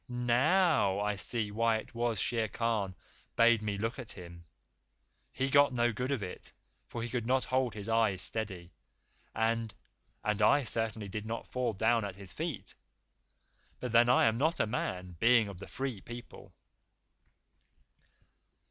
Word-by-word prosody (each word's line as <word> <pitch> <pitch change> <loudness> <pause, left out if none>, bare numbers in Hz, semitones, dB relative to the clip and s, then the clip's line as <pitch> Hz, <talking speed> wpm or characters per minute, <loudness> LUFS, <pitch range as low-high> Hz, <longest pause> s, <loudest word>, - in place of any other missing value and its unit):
"NOW 125 - +2
I 105 0 0
see 105 +2 -2
why 115 +1 +2
it 110 - -9
was 115 -2 -1
Shere 115 -2 0
Khan 110 -4 -1 0.4
bade 115 -1 +5
me 105 -2 -2
look 115 +5 -3
at 125 - -5
him! 85 -2 -11 0.9
He 135 +1 -1
got 140 0 +5
no 120 -1 +2
good 125 +6 -2
of 130 -7 -1
it, 90 - -8 0.4
for 115 - -5
he 120 - -4
could 120 -1 -2
not 130 +1 +2
hold 130 -3 0
his 105 0 -5
eyes 110 -5 +3
steady, 95 -6 -2 0.6
and 115 0 0 0.5
and 105 0 0
I 140 +7 +5
certainly 115 -3 -2
did 105 +2 -5
not 115 +1 -4
fall 125 -3 -2
down 110 +3 +2
at 100 -2 -5
his 100 -2 -9
feet. - - -4 1.1
But 125 - -4
then 120 +1 +5
I 125 - +5
am 110 +1 +2
not 160 +4 +1
a - - +3
man, 90 -6 -4
being 115 -2 +5
of 100 -3 -9
the 100 - -8
Free 130 -6 -4
People." 120 0 -10
115 Hz, 160 wpm, -31 LUFS, 105-120 Hz, 1.1 s, bade